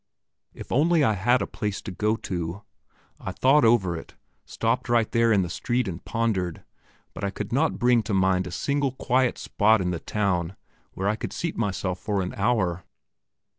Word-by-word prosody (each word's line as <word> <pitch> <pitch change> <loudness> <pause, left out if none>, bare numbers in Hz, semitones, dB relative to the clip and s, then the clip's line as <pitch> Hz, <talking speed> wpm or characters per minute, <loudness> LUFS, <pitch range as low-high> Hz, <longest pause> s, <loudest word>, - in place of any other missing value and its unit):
If - - -10
I - - +1
only 165 +2 +4
had 110 -1 +2
a - - -1
place 105 -1 -4
to 100 - -6
go 105 +4 0
to. 90 -1 -5 0.6
I - - -5
thought 135 +3 +4
over 110 -7 +3
it 80 - -9 0.3
stopped - - -1
right 115 -2 +2
there 115 -1 +3
in 100 -3 +4
the - - -3
street 120 +4 -1
and 90 -2 -6
pondered, 100 -7 -1 0.5
but - - -8
I 100 - +1
could 105 +2 -6
not 150 +5 +1
bring 120 -1 +3
to 110 - -2
mind 95 -1 +2
a - - -7
single 140 +6 -1
quiet 130 -1 +1
spot 110 +1 +2
in 90 -1 -1
the 85 - -3
town 95 -3 -1 0.4
where 95 - -2
I 105 - +2
could - - -6
seat 170 -2 -3
myself 95 -4 -2
for 100 -2 -1
an 90 - -5
hour. 95 -5 0
105 Hz, 190 wpm, -25 LUFS, 95-120 Hz, 0.6 s, only